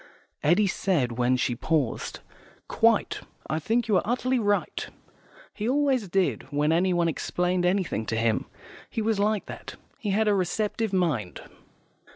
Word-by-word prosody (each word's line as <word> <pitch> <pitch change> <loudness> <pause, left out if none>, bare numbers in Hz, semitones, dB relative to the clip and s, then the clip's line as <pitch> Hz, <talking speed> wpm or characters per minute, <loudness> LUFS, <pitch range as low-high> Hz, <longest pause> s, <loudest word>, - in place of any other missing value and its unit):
Eddy 175 +8 +4
said 175 -9 0
when 125 +1 +3
she 125 0 0
paused, 140 -1 -1 0.5
"Quite. - - +2 0.3
I 155 - -1
think 230 +8 0
you 205 -4 +4
are - - +3
utterly 250 +2 0
right." 205 -2 0 0.7
He 215 +3 -2
always 270 -5 +2
did, 185 -6 0
when 145 +2 +1
anyone 175 0 +2
explained 180 +2 0
anything 180 - 0
to 110 - -1
him; 115 -1 +1 0.4
he 225 - -2
was 220 -2 +1
like 210 0 +1
that; - - -8 0.2
he 210 - -3
had 215 +3 +2
a 210 - +4
receptive 210 +3 -1
mind. 155 - -1
185 Hz, 150 wpm, -26 LUFS, 155-215 Hz, 0.7 s, Eddy